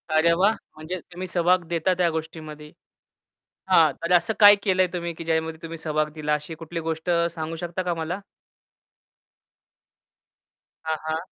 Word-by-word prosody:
अरे, 165 +2 +5
वाह! 195 +5 +3 0.2
म्हणजे 165 +4 -5
तुम्ही 185 +1 -6
सहभाग 180 0 +2
देता 170 +2 +1
त्या 175 -2 +3
गोष्टीमध्ये. 155 -1 -7 1.0
हां, 160 -3 +5
तर 170 +2 0
असं 180 +6 +3
काय 205 0 +10
केलं 185 -2 +3
आहे 180 - -1
तुम्ही, 170 -1 -3
की 165 - -8
ज्यामध्ये 160 0 -1
तुम्ही 165 0 -7
सहभाग 155 -1 -1
दिला 150 -1 -1
अशी 150 +2 -5
कुठली 165 +1 -6
गोष्ट 160 +2 -3 0.2
सांगू 160 0 -5
शकता 175 +2 -4
का 175 -1 -1
मला? 170 +4 -4 2.7
हां, 160 0 -1
हां. 155 - 0
165 Hz, 155 wpm, -24 LUFS, 160-180 Hz, 2.7 s, काय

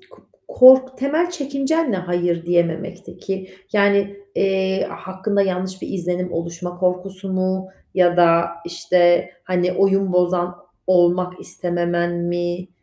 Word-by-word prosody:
k - - -22 0.3
kork 260 0 +6
temel 310 +6 0
çekincen 285 -1 -1
ne - - 0
hayır 175 -2 -2
diyememekteki? 180 +2 -3 0.2
Yani, 200 -1 +2 0.2
eee, 190 -1 0
hakkında 190 +2 -2
yanlış 185 0 -3
bir - - -5
izlenim 180 -1 -3
oluşma 170 +1 -5
korkusu 185 +1 -2
mu 185 0 -1 0.3
ya 175 -1 +3
da, 170 -1 +5 0.2
işte, 175 +1 +2
hani, 180 -1 0
oyun 195 0 +2
bozan 180 0 +1 0.3
olmak 180 0 +2
istememen 175 -1 -2
mi? 175 +1 -3
180 Hz, 115 wpm, -20 LUFS, 175-195 Hz, 0.3 s, kork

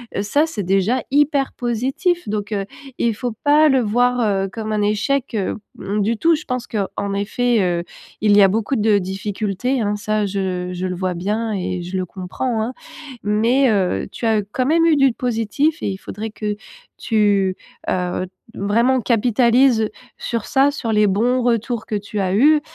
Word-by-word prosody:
heu, - - 0
ça 285 +10 +2
c'est 315 -11 -4
déjà 195 +7 +1
hyper 285 -1 +2
positif, 265 - -1
donc, 210 0 -3
heu, 200 -2 -1 0.3
il 230 -2 +1
faut 245 +3 -3
pas 300 +1 +5
le 265 -2 +4
voir, 245 +2 +2
heu, 195 -4 +1
comme 215 0 -4
un 210 - 0
échec, 215 +7 0
heu, 195 -3 -1 0.2
mmh, 200 +2 -2
du 220 +3 0
tout. 330 +7 +3
Je 305 - -6
pense 250 -2 -4
qu'en 200 -1 -3
effet, 225 +3 +1
heu, 175 -2 0 0.4
il 210 -1 +4
y 205 - +7
a 195 - +8
beaucoup 220 +6 0
de 215 -2 +3
difficultés, 200 +5 -2
hein, 205 -1 0
ça 210 0 -1
je 190 -2 -2
je 180 +1 -3
le 180 - -3
vois 185 0 -2
bien 210 +6 -2
et 180 -2 -3
je 180 +2 -4
le 185 - -1
comprends, 210 +6 -3
hein. 245 +4 -3 0.5
Mais, 230 +6 +3
heu, 195 -4 0
tu - - -5
as 220 -2 +3
quand 255 - 0
même 330 +4 +3
eu 330 -2 +5
du 275 -3 +4
positif 250 +7 -1
et - - 0
il 190 - -5
faudrait 215 +3 -6
que 210 -1 -3 0.4
tu, 205 -4 +2 0.3
heu, 180 0 -1 0.3
vraiment 235 +6 +2
capitalises 235 +1 +3 0.3
sur 230 -3 -3
ça, 275 +1 +3
sur 255 -6 -3
les 210 -1 +4
bons 240 +6 +2
retours 235 -1 0
que 215 - -3
tu 205 +1 -4
as 185 -1 0
eus, 295 +7 +5
215 Hz, 185 wpm, -20 LUFS, 200-250 Hz, 0.5 s, a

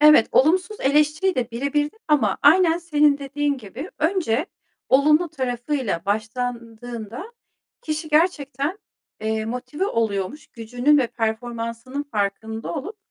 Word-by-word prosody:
Evet, 300 -6 +7
olumsuz 360 +8 +3
eleştiriyi 300 +7 +2
de 250 -1 -2
birebirde 290 - -1
ama 300 -2 +3
aynen 330 +3 +6
senin 300 -4 +3
dediğin 285 0 -1
gibi 250 - -8
önce 325 - +1 0.4
olumlu 300 +5 +4
tarafıyla 255 - -2
başlandığında 230 - -4 0.5
kişi 310 -2 -3
gerçekten, 300 +1 +1 0.4
eee, 220 0 -1
motive 255 - -3
oluyormuş. 225 - -2
Gücünün 245 +6 +1
ve 250 - +2
performansının 230 +3 -3
farkında 220 - -3
olup, 405 +10 -5
275 Hz, 110 wpm, -23 LUFS, 230-300 Hz, 0.5 s, Evet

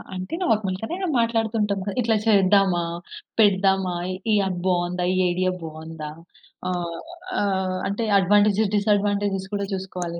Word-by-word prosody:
అంటే, 185 - -6
నార్మల్‌గానే 215 - -1 0.2
మాట్లాడుతుంటాం 225 -3 0
క - - -12
ఇట్లా 225 -1 +2
చేద్దామా? 195 -4 +4 0.6
పెడదామా? 190 -3 +3 0.4
ఈ - - +4
యాప్ 185 -2 -2
బావుందా? 180 0 0
ఈ 185 - 0
ఐడియా 185 +1 +1
బావుందా? 160 -1 -7 0.6
ఆహ్, 175 -2 -3 0.4
ఆహ్, 190 -2 0
అంటే, 200 +4 -2 0.2
అడ్వాంటేజ్, 205 +2 +4
డిసాడ్వాంటేజేస్ 205 -2 +1
కూడా 200 - -1
చూసుకోవాలి 180 -3 -4
195 Hz, 120 wpm, -23 LUFS, 180-205 Hz, 0.6 s, చేద్దామా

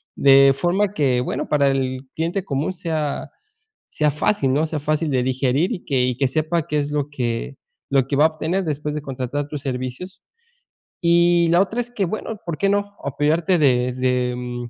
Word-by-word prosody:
De 135 0 +6
forma 185 +8 0
que, 135 -8 +1
bueno, 125 - -3
para 145 -2 +3
el 130 -1 -2
cliente 170 +4 -1
común 140 +1 -1
sea 160 -5 -3 0.6
sea 150 0 0
fácil, 145 -2 +1
¿no? 150 +3 +2
Sea 155 -1 -3
fácil 155 +1 -1
de 130 -2 +2
digerir 130 - +1
y 185 - -7
que 135 -4 +1
y 125 -1 0
que 135 0 +2
sepa 155 +3 0
qué 150 - -1
es 145 0 -1
lo 145 -1 -1
que 125 -1 -3 0.3
lo 135 -2 +3
que 140 - -1
va 150 - +5
a - - +8
obtener 160 +4 -2
después 150 -1 -3
de 150 - -3
contratar 135 +1 -4
tus 150 - -5
servicios. 135 +8 -5 0.8
Y 170 0 +4
la 170 +2 +5
otra 215 +5 -1
es 240 0 -7
que, 215 -5 -2
bueno, 215 +3 -5
¿por 170 -3 -4
qué 200 - +1
no?, 205 0 -1
apoyarte 155 +6 +1
de 125 -3 +2
de, 125 -1 0
mm, 120 -1 -5
145 Hz, 195 wpm, -21 LUFS, 130-170 Hz, 0.8 s, a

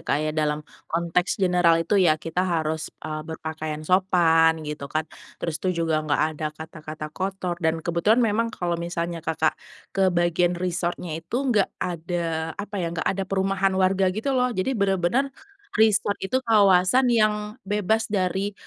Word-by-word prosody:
Kak, - - 0
ya. 155 - -1
Dalam 150 -1 -1 0.2
konteks 170 +2 0
general 180 -3 +4
itu 200 +2 +2
ya 165 -4 +4
kita 165 +3 -3
harus, 160 -2 -1 0.2
eee, 155 -1 -3
berpakaian 155 -1 -5
sopan, 165 -3 +4
gitu 150 -2 -5
kan. 155 +2 -1 0.3
Terus 165 -2 -4
tuh 185 - -1
juga 165 -3 +1
nggak 155 -1 +1
ada 155 0 -4
kata-kata 155 0 -8
kotor. 185 -2 -3
Dan 160 -1 0
kebetulan 205 +8 +3
memang 225 +1 +1
kalau 175 -6 -3
misalnya 170 0 -3
Kakak 160 -1 0 0.4
ke 195 -1 +3
bagian 175 0 +1
resort-nya 175 -1 -2
itu 170 +8 -4 0.2
nggak 205 -3 +3
ada, 165 -2 -3
apa 205 0 -6
ya, 170 - -1
nggak 165 0 -4
ada 195 0 -3
perumahan 195 0 +1
warga, 190 0 +3
gitu 215 +9 -2
loh. 250 -1 +2
Jadi 240 +2 -1
bener-bener 200 +5 +1 0.4
resort 215 -2 +2
itu 215 +7 -1
kawasan 205 +2 +4
yang 215 -1 +1
bebas 210 +2 +1
dari, 190 +1 0
180 Hz, 160 wpm, -24 LUFS, 160-195 Hz, 0.4 s, general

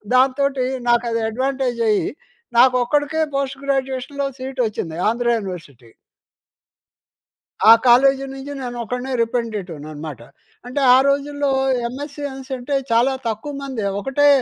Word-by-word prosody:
దాంతోటి 265 0 +2 0.2
నాకు 240 0 +3
అది 230 - 0
అడ్వాంటేజ్ 260 0 -1
అయ్యి, 210 - +2 0.5
నాకు 255 0 +6
ఒక్కడికే 295 +4 0 0.2
పోస్ట్ 270 -1 -2
గ్రాడ్యుయేషన్‌లో 270 +1 -1
సీట్ 260 0 -6
ఒచ్చింది 165 -6 -5
ఆంధ్ర 235 +1 -1
యూనివర్సిటీ. 155 - -9 1.8
ఆ - - +12 0.2
కాలేజీ 270 +3 +5
నుంచి 270 +1 -8
నేనొకడినే 245 +1 -4
రిపెంటిటివ్‌ననమాట. 165 - -4 0.5
అంటే 275 +3 -2
ఆ - - +7
రోజుల్లో 285 0 0 0.4
ఎంఎస్‌సీ 285 +3 -7
అనిసంటే, 265 +1 -4 0.2
చాలా 240 +4 +3
తక్కువ 225 +7 -4
మందే, 260 -7 -4
ఒకటే 275 +6 +2
255 Hz, 110 wpm, -20 LUFS, 230-275 Hz, 1.8 s, ఆ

